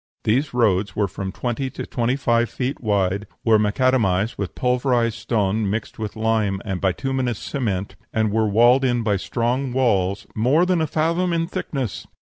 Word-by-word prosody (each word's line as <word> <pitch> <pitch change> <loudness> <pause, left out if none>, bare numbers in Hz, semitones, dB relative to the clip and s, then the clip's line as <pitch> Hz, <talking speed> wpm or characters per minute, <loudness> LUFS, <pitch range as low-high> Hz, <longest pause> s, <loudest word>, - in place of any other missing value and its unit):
These 130 +7 +1
roads 105 -5 +1
were 105 -1 +1
from 95 0 -5
twenty 125 +5 -3
to - - -6
twenty 120 +1 0
five 120 -4 +1
feet 130 +2 -3
wide, 100 -2 0 0.2
were 110 -2 +5
macadamized 105 -2 +1
with 100 -2 -5
pulverized 125 -2 +1
stone 105 -2 0
mixed 110 +2 -4
with 110 -2 -4
lime 110 -3 0
and 95 -4 -3
bituminous 125 +5 -1
cement, 105 -9 -3 0.2
and 110 -1 +1
were 110 0 +2
walled 120 +5 +5
in 120 -2 +1
by 105 -3 +1
strong 125 +6 -1
walls 100 -6 +1
"more 135 +10 +3
than 180 -2 +1
a 160 - +1
fathom 170 +4 0
in 165 0 +1
thickness." 140 - -4
115 Hz, 165 wpm, -22 LUFS, 105-130 Hz, 0.2 s, were